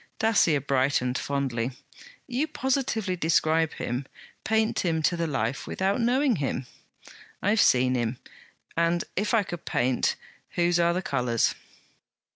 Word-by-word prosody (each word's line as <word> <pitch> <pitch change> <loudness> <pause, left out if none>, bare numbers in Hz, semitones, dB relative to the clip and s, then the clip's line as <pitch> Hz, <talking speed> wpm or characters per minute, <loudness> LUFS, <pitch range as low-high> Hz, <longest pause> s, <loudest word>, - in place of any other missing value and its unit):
Dacier 200 -10 +3
brightened 130 -2 +1
fondly. 130 -3 -2 0.5
'You 265 +4 -1
positively 250 -9 -1
describe 160 -1 +2
him; 125 +3 -4 0.4
paint 220 0 +1
him 160 -3 0
to 175 - +2
the 170 -1 -1
life, 135 -3 -2
without 195 +5 0
knowing 250 0 +2
him!' 135 -2 -2 0.8
'I 200 - +2
have 220 - +4
seen 125 0 +4
him; 120 -1 -1 0.6
and 170 +1 +1
if 210 +4 +1
I 215 - +3
paint, 130 -8 -1 0.4
whose 175 0 +2
are 170 0 +3
the 185 - -2
colours?' 125 -6 +1
165 Hz, 130 wpm, -26 LUFS, 130-205 Hz, 0.8 s, have